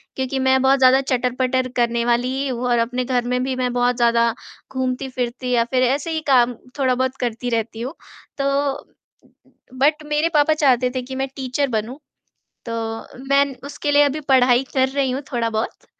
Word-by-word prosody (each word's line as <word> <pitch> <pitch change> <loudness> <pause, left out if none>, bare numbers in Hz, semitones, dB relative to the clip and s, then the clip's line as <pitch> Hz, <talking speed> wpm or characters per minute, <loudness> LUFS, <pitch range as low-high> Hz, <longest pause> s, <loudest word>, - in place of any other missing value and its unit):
क्योंकि 265 0 -2
मैं 265 0 +3
बहुत 265 +1 +4
ज़्यादा 260 +1 +5
चटर-पटर 255 0 0
करने 235 -1 +1
वाली 240 +1 +1
ही 275 - -1
हूँ 250 -1 -3
और 240 -1 +3
अपने 250 +2 -1
घर 245 -2 0
में 250 - +1
भी 260 -1 -2
मैं 250 -1 -1
बहुत 245 0 +1
ज़्यादा 235 -1 +3 0.4
घूमती-फिरती 255 -1 -3
या 235 -1 +3
फिर 255 -1 +2
ऐसे 275 +6 0
ही 315 -1 -2
काम 250 -2 +4 0.3
थोड़ा 260 -2 +2
बहुत 260 +1 -1
करती 245 0 -2
रहती 225 0 -2
हूँ 260 +6 -4 0.4
तो 275 - -1 0.3
उ 270 - -5 0.5
उ 255 - -22
बट 300 +2 +2
मेरे 300 +2 +1
पापा 300 +1 +4
चाहते 255 -5 +2
थे 255 - -1
कि 260 +1 -7
मैं 270 +1 -1
टीचर 270 +1 -1
बनूँ। 225 +3 -3 0.7
तो 230 - -4 0.6
मैं 280 0 +5
न 275 - -8
उसके 290 0 -3
लिए 290 0 +6
अभी 290 +2 +1
पढ़ाई 255 -1 +5
कर 260 0 +3
रही 270 -1 0
हूँ 265 +2 -2
थोड़ा-बहुत। 230 -2 -2
255 Hz, 190 wpm, -21 LUFS, 245-270 Hz, 0.7 s, लिए